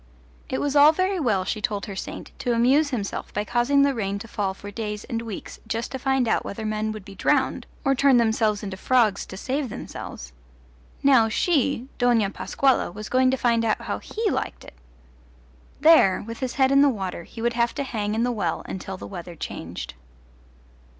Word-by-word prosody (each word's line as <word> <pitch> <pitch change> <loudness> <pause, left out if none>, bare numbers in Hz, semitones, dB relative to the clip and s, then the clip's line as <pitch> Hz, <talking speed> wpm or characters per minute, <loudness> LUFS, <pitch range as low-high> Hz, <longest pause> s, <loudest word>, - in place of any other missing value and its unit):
It - - -1
was 290 0 -1
all 290 +1 +8
very 370 +3 0
well, 210 - +1
she 215 - -2
told 210 -3 -2
her 200 - -7
saint, - - -7
to 245 - 0
amuse 265 +6 +3
himself 220 -7 -4
by 210 - 0
causing 245 +6 +3
the 280 0 +3
rain 200 -4 -2
to 225 +3 -8
fall 200 -4 -2
for 205 +1 -9
days 210 -1 -4
and 230 -1 -3
weeks 225 -4 -7
just 230 +1 -3
to 265 - -4
find 265 -2 +1
out - - +1
whether 220 +2 -6
men 215 0 -1
would 215 -3 -8
be 200 - -10
drowned 260 +3 +1 0.2
or 275 - +4
turn 270 -1 +4
themselves 220 -2 +2
into 195 -2 -5
frogs 220 -3 +2
to 190 - -8
save 265 +4 -2
themselves: - - -8 0.7
now 260 -5 +5
she, 280 -2 +1
Dona 235 -5 +3
Pascuala, 270 +5 +1
was 215 +3 -8
going 255 0 +4
to 265 - +1
find 235 -2 +2
out 220 -2 +1
how - - -3
he 445 0 -3
liked - - -3
it. - - -12 1.1
There, 310 - +6
with 230 +1 -7
his 260 -2 -3
head 265 -1 +3
in 275 0 +6
the 285 - +6
water, 190 -8 -3
he 225 - -12
would 235 +1 0
have 235 0 0
to 280 - -1
hang 215 -5 -2
in 230 - +1
the 245 - +1
well 195 -8 -2
until 190 0 -6
the - - -8
weather 175 -2 -8
changed. 85 - -6
230 Hz, 205 wpm, -24 LUFS, 205-265 Hz, 1.1 s, all